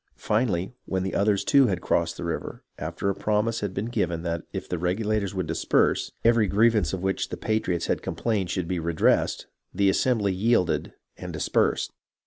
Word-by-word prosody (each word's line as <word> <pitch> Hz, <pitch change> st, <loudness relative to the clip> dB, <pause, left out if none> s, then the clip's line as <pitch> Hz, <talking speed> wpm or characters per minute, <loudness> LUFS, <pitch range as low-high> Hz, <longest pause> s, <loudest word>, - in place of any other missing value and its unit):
Finally, 105 Hz, -3 st, 0 dB
when 95 Hz, 0 st, -2 dB
others 100 Hz, -1 st, +2 dB
too 140 Hz, -3 st, +5 dB
had 95 Hz, -3 st, -1 dB
crossed 85 Hz, -1 st, 0 dB
the -, -, -5 dB
river, 85 Hz, -1 st, -4 dB, 0.2 s
after 85 Hz, +5 st, -3 dB
a 100 Hz, -, +2 dB
promise 105 Hz, +3 st, 0 dB
had 105 Hz, -2 st, -3 dB
been 100 Hz, +3 st, -3 dB
given 90 Hz, -8 st, -1 dB
that 85 Hz, -1 st, -2 dB
if -, -, -5 dB
the 90 Hz, -, -3 dB
Regula 105 Hz, +5 st, 0 dB
tors 100 Hz, -1 st, -4 dB
would 95 Hz, -2 st, -1 dB
disperse, -, -, +1 dB
every 115 Hz, -2 st, +4 dB
grievance 105 Hz, -3 st, +3 dB
of 95 Hz, -1 st, -4 dB
which 95 Hz, 0 st, -1 dB
the -, -, -5 dB
patriots 95 Hz, -6 st, -1 dB
had -, -, -1 dB
complained 105 Hz, -6 st, -1 dB
should 90 Hz, -3 st, -2 dB
be 90 Hz, 0 st, -1 dB
redressed, 85 Hz, -1 st, +1 dB, 0.3 s
the 100 Hz, +1 st, +3 dB
assembly 105 Hz, -3 st, +1 dB
yielded 95 Hz, -2 st, +1 dB, 0.2 s
and -, -, -7 dB
dispersed. -, -, 0 dB
95 Hz, 180 wpm, -26 LUFS, 90-110 Hz, 0.3 s, too